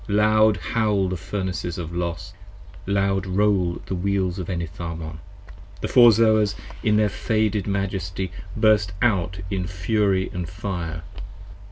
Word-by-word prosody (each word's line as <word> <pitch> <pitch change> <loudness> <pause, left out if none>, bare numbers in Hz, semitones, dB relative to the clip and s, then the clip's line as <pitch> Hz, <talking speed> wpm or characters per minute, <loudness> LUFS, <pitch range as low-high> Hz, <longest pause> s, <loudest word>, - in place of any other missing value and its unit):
Loud 110 +1 +4
howl 105 -4 0
The 95 - -2
Furnaces 90 -1 -4
of 85 -1 -5
Los! 85 -2 -3 0.5
loud 100 -1 +1
roll 95 -2 +1
the - - -4
Wheels 95 0 -1
of 90 - -4
Enitharmon! 85 -2 -5 0.6
55 - - -18
The - - -1
Four 120 -1 +7
Zoas 110 -2 +3 0.3
in 105 - +2
all - - +4
their 105 -1 +3
faded 110 -2 0
majesty 95 -2 -2 0.3
burst 105 -4 +3
out 90 -5 +1
in 95 -2 -1
fury 95 +1 0
And 90 -2 -4
fire. 85 -4 -4
95 Hz, 140 wpm, -23 LUFS, 90-105 Hz, 0.6 s, Four